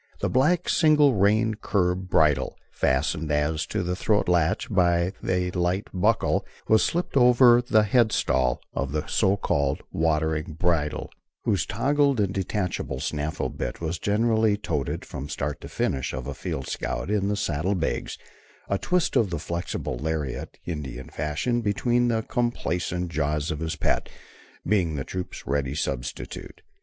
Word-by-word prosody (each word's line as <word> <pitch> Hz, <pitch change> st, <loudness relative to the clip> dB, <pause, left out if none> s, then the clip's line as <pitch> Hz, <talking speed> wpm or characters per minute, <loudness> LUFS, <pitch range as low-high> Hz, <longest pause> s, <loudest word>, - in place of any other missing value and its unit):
The -, -, -1 dB
black, 150 Hz, +7 st, +2 dB
single 150 Hz, -4 st, +5 dB
reined 110 Hz, +2 st, +2 dB
curb 90 Hz, -2 st, 0 dB
bridle, 75 Hz, -6 st, +2 dB
fastened 75 Hz, +4 st, 0 dB
as 75 Hz, +1 st, 0 dB
to 105 Hz, -3 st, -2 dB
the 90 Hz, +1 st, -1 dB
throat 105 Hz, +2 st, +1 dB
latch 90 Hz, +3 st, +2 dB
by 90 Hz, -2 st, +2 dB
a 90 Hz, -1 st, 0 dB
light 90 Hz, +2 st, -1 dB
buckle, 105 Hz, +4 st, +2 dB, 0.2 s
was 110 Hz, 0 st, +5 dB
slipped 175 Hz, -2 st, -1 dB
on 135 Hz, -, +5 dB
over 120 Hz, 0 st, +7 dB
the 110 Hz, -3 st, +3 dB
headstall 105 Hz, -, +2 dB
of 70 Hz, +1 st, -2 dB
the 75 Hz, +1 st, -1 dB
so 100 Hz, +1 st, +2 dB
called 70 Hz, -7 st, 0 dB
watering 80 Hz, 0 st, 0 dB
bridle, 80 Hz, -2 st, -1 dB, 0.3 s
whose -, -, +1 dB
toggled 140 Hz, -2 st, +2 dB
and 100 Hz, -2 st, +1 dB
detachable 90 Hz, -8 st, -2 dB
snaffle 75 Hz, +2 st, -2 dB
bit -, -, -5 dB
was 80 Hz, 0 st, -3 dB
generally 110 Hz, 0 st, +2 dB
"toted" 75 Hz, -9 st, -3 dB
from 70 Hz, +2 st, -7 dB
start 70 Hz, 0 st, -3 dB
to -, -, -8 dB
finish 65 Hz, -, -1 dB
of 65 Hz, -1 st, -4 dB
a 70 Hz, -, -4 dB
field 65 Hz, 0 st, -4 dB
scout -, -, -3 dB
in 100 Hz, -2 st, +1 dB
the 105 Hz, 0 st, 0 dB
saddle 95 Hz, +1 st, 0 dB
bags, 85 Hz, -3 st, -2 dB, 0.5 s
a 100 Hz, -, +1 dB
twist 180 Hz, -2 st, 0 dB
of 110 Hz, -, +3 dB
the 85 Hz, -, -2 dB
flexible 85 Hz, -5 st, -4 dB
lariat, 75 Hz, -2 st, -3 dB
Indian 70 Hz, -6 st, -5 dB
fashion, 75 Hz, -, -1 dB
between 120 Hz, +3 st, +1 dB
the 115 Hz, -2 st, +1 dB
complaisant 90 Hz, -8 st, -2 dB
jaws 75 Hz, +1 st, -1 dB
of 75 Hz, -, -3 dB
his 80 Hz, 0 st, -2 dB
pet, -, -, 0 dB, 0.6 s
being 90 Hz, -6 st, +2 dB
the 70 Hz, -, -2 dB
troop's 90 Hz, +4 st, -6 dB
ready 70 Hz, -1 st, -1 dB
substitute. 65 Hz, -4 st, -5 dB
90 Hz, 155 wpm, -25 LUFS, 75-110 Hz, 0.6 s, over